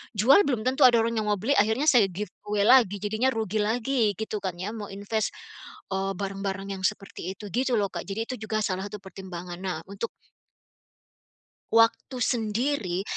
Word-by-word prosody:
jual 270 - +5
belum 245 -6 0
tentu 260 +3 +5
ada 245 - +4
orang 230 0 0
yang 215 - -2
mau 210 - +3
beli. 220 +7 -2
Akhirnya 220 +9 +3
saya 230 -6 +5
giveaway 205 +2 -3
lagi, 215 -4 +5
jadinya 220 +5 +1
rugi 220 -1 -1
lagi, 225 0 +1
gitu 215 0 -4
kan 185 -3 -4
ya. 185 +4 -4
Mau 215 -2 -6
inves, 205 +2 -2 0.6
eee, 195 0 -1
barang-barang 195 0 -4
yang 190 -1 -6
seperti 195 -3 -6
itu 205 0 -9
gitu 255 0 +1
loh, 200 -3 0
Kak. - - -6
Jadi 200 +3 -2
itu - - -3
juga 215 0 0
salah 190 0 -2
satu 205 -1 -9
pertimbangan. 180 -2 -8
Nah, 185 -4 -3
untuk 200 +3 -4 1.7
waktu 230 +3 +3
sendiri, 220 -4 0
210 Hz, 175 wpm, -26 LUFS, 195-230 Hz, 1.7 s, jual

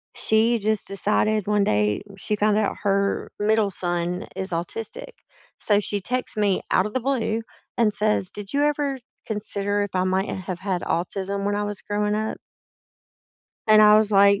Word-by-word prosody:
she 225 +2 +2
just 215 0 +2
decided 210 +1 +1
one 210 -1 +2
day 105 - +1 0.2
she 210 - -2
found 210 0 +2
out 210 -2 0
her 200 -1 0
middle 215 0 +2
son 175 0 -2
is 190 0 -4
autistic 225 - -4 0.5
so, 205 -1 +3
she 205 0 -2
texts 250 0 -3
me 200 -3 +2
out 185 - +3
of 210 - -5
the 255 - -1
blue 230 -4 0 0.4
and 220 -3 +3
says, 210 -3 +1
"Did 205 +2 -7
you 285 - +2
ever 290 -2 0 0.3
consider 205 -1 -1
if 205 - -4
I 185 0 +1
might 190 +1 0
have 185 -1 -5
had 190 -2 -2
autism 195 +3 -2
when 205 - 0
I 205 - -1
was 205 -1 -5
growing 210 0 -1
up?" 220 0 -2 1.3
And 215 0 +7
I 210 0 +8
was, 215 -1 +3
like, 200 0 +5
205 Hz, 175 wpm, -23 LUFS, 195-215 Hz, 1.3 s, I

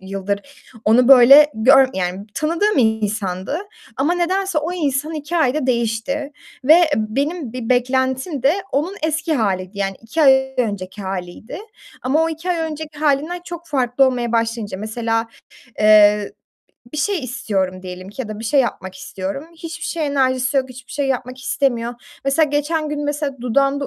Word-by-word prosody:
yıldır 195 +1 -3 0.4
onu 240 +3 +4
böyle 275 +3 +9
gör 260 +4 +5
yani 185 +2 -3
tanıdığım 340 +6 +1
insandı 215 - 0 0.4
ama 295 +6 +1
nedense 370 0 0
o 315 +4 -3
insan 305 -2 -1
2 305 +3 -4
ayda 290 -3 +1
değişti 245 +4 -1 0.3
ve 310 +5 +8 0.2
benim 270 +6 -2
bir 245 -3 -5
beklentim 260 +3 0
de 275 +3 +4 0.2
onun 330 +8 -1
eski 320 +1 0
haliydi, 195 -5 -1
yani, 195 -1 -2
2 270 +8 -1
ay 265 -1 +4
önceki 205 -4 -3
haliydi 190 - -6 0.4
ama 285 +5 +2
o 325 - +1
2 325 +3 -4
ay 350 - 0
önceki 310 -2 -5
halinden 305 +4 0
çok 345 -1 -8
farklı 265 -3 +2
olmaya 245 -2 -1
başlayınca 230 -4 -1
mesela, 225 +2 -2 0.5
eee, 210 -1 +5 0.6
bir - - -5
şey 380 +6 0
istiyorum 190 -7 -2
diyelim 185 0 -8
ki 210 +6 -6
ya 225 - -8
da 215 -1 -6
bir 225 - -7
şey 275 +5 +3
yapmak 190 -7 -3
istiyorum. 190 +7 -6
Hiçbir 330 +1 -7
şeye 320 -3 -2
enerjisi 260 -1 +1
yok, 265 -1 +1
hiçbir 255 0 -12
şey 285 -1 -1
yapmak 255 -1 -3
istemiyor. 245 -3 -1 0.3
Mesela 275 +3 +3
geçen 300 +2 -1
gün, 295 0 -3
mesela, 290 -1 -2
dudağımda 275 +3 +1
260 Hz, 160 wpm, -19 LUFS, 220-300 Hz, 0.6 s, böyle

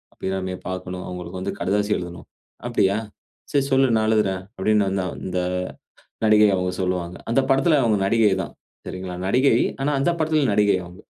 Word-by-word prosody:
"அபிராமிய 95 -1 -3
பார்க்கனும். 90 0 -5
அவங்களுக்கு 90 0 -6
வந்து - - -3
கடுதாசி 105 +2 0
எழுதனும். 90 0 -8 0.4
அப்டியா? 100 +1 +2 0.6
சரி 140 - +3
சொல்லு 135 0 +4
நான் 110 0 +2
எழுதுறேன்." 100 -4 +1 0.2
அப்டின்னு 105 +1 +2
வந்து 95 -1 -1 0.2
இந்த 90 0 -1 0.9
நடிகை 105 0 +6
அவங்க 90 -1 -1
சொல்வாங்க. 90 -1 -2
அந்த 130 +4 +4
படத்துல 135 +3 +4
அவங்க 110 -3 +3
நடிகை 110 -1 +3
தான். - - -8 0.3
சரிங்களா, 95 -1 -5
நடிகை, 130 +7 +4 0.2
ஆனா 140 +2 +1
அந்த 155 - +2
படத்துல 155 -3 +2
நடிகை 105 -1 +3
அவுங்க. 90 +3 -12
100 Hz, 155 wpm, -23 LUFS, 90-115 Hz, 0.9 s, நடிகை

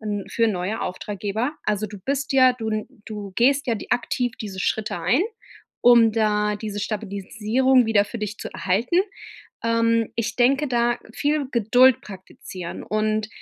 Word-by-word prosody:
n 205 -2 -3
für 230 -1 +1
neue 200 +3 -2
Auftraggeber 210 - -3
also, 215 0 0
du 210 - -10
bist 280 +1 -1
ja 255 -1 +6
du 225 -3 -5
n 215 0 -3 0.2
du 210 -2 -6
gehst 275 +3 +3
ja 230 - +1
d - - -8
aktiv 245 0 0
diese 195 -3 -6
Schritte 210 -2 -1
ein, 195 - +2 0.6
um 235 -2 +6
da 210 -1 +1
diese 205 -1 -5
Stabilisierung 220 +5 +1
wieder 210 -2 +3
für 230 +3 -7
dich 210 0 -4
zu - - -6
erhalten. 215 - 0 0.7
Ähm, 230 0 +2
ich 230 0 -2
denke 270 +4 +3
da 240 0 +1 0.2
viel 290 -1 0
Geduld 245 +2 +5
praktizieren 185 -2 -9
und, 215 0 -1
220 Hz, 155 wpm, -23 LUFS, 210-245 Hz, 0.7 s, ja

